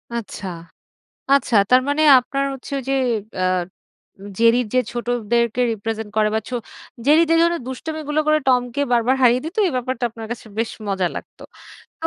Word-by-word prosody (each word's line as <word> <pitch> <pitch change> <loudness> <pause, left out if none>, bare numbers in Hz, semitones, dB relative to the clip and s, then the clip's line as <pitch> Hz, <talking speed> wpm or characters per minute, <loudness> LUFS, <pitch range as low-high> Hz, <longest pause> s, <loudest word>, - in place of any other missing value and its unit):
আচ্ছা, 210 -3 -6 0.9
আচ্ছা। 245 -5 +2
তার 255 0 +6
মানে 290 +2 +1 0.2
আপনার 275 +2 -2
হচ্ছে 270 - -11
ওই - - -5
যে - - +2 0.4
অ্যাঁ 185 -1 +1 0.8
জেরির 230 +1 +3
যে 255 - +4
ছোটদেরকে 235 0 -1
রিপ্রেজেন্ট 220 0 -4
করে 215 0 +3
বা 220 - +2
ছো 250 - -3 0.5
জেরি 305 +3 +6
যে 330 - +4
ধরনের 340 -3 +1
দুষ্টামিগুলো 310 +2 -3
করে 305 0 +4
টমকে 250 +1 +1
বারবার 240 +3 +2
হারিয়ে 245 0 +4
দিত। 335 +7 -6
এই - - -2
ব্যাপারটা 255 0 -3
আপনার 225 0 -9
কাছে 235 - -6
বেশ 225 0 -1 0.2
মজা 190 -2 0
লাগত। - - -9 0.6
তো 325 - -1
245 Hz, 165 wpm, -21 LUFS, 225-275 Hz, 0.9 s, তার